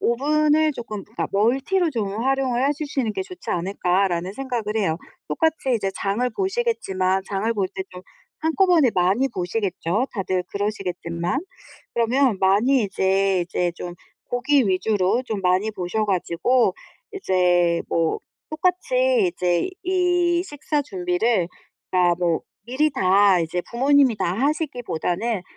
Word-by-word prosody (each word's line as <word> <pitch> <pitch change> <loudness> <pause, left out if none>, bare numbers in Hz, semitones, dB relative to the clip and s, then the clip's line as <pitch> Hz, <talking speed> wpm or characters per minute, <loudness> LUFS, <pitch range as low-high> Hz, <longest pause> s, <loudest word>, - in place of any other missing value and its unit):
'오븐을 305 +5 +2
조금 215 -6 -6
그러니까 220 +4 -4
멀티로 270 - +2
좀 215 -3 -3
활용을 265 -1 +1
해 285 - +3
주시는 280 -7 -2
게 - - -3
좋지 365 -2 -8
않을까?'라는 180 0 0
생각을 235 -4 -3
해요. 175 -7 +1 0.3
똑같이 320 -5 0
이제 195 -4 -1
장을 210 +7 -1
보시겠지만 230 - 0
장을 205 +3 -1
볼 200 -4 0
때 190 - -3
좀 180 0 -10 0.4
한꺼번에 320 -4 +3
많이 190 +9 +2
보시겠죠 195 +1 -2
다들 185 -3 -1
그러시겠지만. 180 - -2 0.5
그러면 235 0 +2
많이 215 +7 +3
이제 190 -1 +1
이제 175 0 -1
좀 175 0 -7 0.4
고기 265 +3 +2
위주로 190 +3 +1
좀 210 -3 -3
많이 185 +4 +1
보셔 205 +3 -2
가지고 195 +3 +1 0.4
이제 180 - +2
뭐 165 -1 0 0.3
똑같이 385 +6 +1
이제 175 - 0
이 355 -1 +1
식사 295 -3 -2
준비를 185 -4 0 0.4
그러니까 180 -1 +3
뭐 170 -2 +1 0.2
미리 295 +5 +1
다 195 -5 +4
이제 165 +2 -2
부모님이 265 0 +3
다 175 - -1
하시기보다는 240 - -1
220 Hz, 295 characters per minute, -23 LUFS, 185-280 Hz, 0.5 s, 다